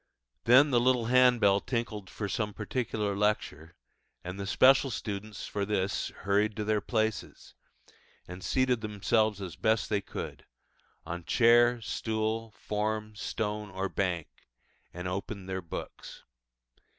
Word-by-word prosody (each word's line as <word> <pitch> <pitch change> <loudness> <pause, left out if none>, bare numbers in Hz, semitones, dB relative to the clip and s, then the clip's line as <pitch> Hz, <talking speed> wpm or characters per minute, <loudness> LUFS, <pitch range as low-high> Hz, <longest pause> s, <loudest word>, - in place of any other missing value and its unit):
Then 130 +5 +6
the 120 - +4
little 125 -1 +2
handbell 120 -5 +5
tinkled 110 -4 -4
for 105 - -4
some 105 -1 -2
particular 110 -5 -2
lecture, 90 -6 -1 0.5
and 90 +2 -6
the 100 - -4
special 135 +5 +5
students 105 -2 -5
for 100 - -3
this 100 -1 -1
hurried 105 +2 +1
to 105 - -2
their 105 0 +1
places, 110 -1 -2 0.7
and 90 +1 -9
seated 130 -3 +1
themselves 105 0 0
as 90 -5 -6
best 110 +4 +1
they 105 -1 +2
could - - -7 0.6
on 85 +1 -5
chair, 120 +3 +5
stool, 110 +1 -2
form, 105 0 -2
stone, 105 0 -3
or 95 0 -3
bank, 90 -5 -1 0.7
and 90 +1 -6
opened 95 +1 -5
their 95 0 -3
books. 85 - -8
105 Hz, 130 wpm, -29 LUFS, 100-115 Hz, 0.7 s, Then